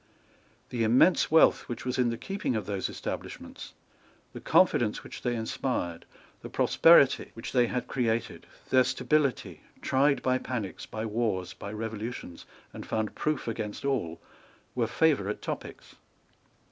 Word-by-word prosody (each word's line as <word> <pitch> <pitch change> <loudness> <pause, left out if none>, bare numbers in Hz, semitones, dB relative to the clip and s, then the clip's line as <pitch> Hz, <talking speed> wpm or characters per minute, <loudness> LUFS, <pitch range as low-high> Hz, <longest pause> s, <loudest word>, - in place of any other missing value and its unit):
The 120 -2 -1
immense 125 +11 +4
wealth 160 +1 +4
which 120 - -5
was 125 0 -2
in 125 -1 +3
the 115 - -3
keeping 195 - -3
of 110 - -2
those 100 -2 -2
establishments, - - -7 0.6
the - - -8
confidence - - +3
which - - -9
they 120 -1 -1
inspired, 110 -6 -3 0.4
the - - -8
prosperity 165 -5 +5
which 115 - -7
they 125 -2 +3
had 125 +1 -2
created, 115 -3 -2 0.2
their 130 -1 +6
stability, 150 0 0 0.2
tried 140 +2 +2
by 130 0 +2
panics, 115 -8 -5
by 110 0 -5
wars, 105 -5 -1
by 100 - -8
revolutions, 110 -4 -6 0.3
and - - -7
found 110 -1 -2
proof 155 -4 -2
against 110 +1 -4
all, 105 -13 -1 0.5
were 120 -2 0
favourite 110 -8 +1
topics. - - -7
120 Hz, 140 wpm, -28 LUFS, 110-130 Hz, 0.6 s, their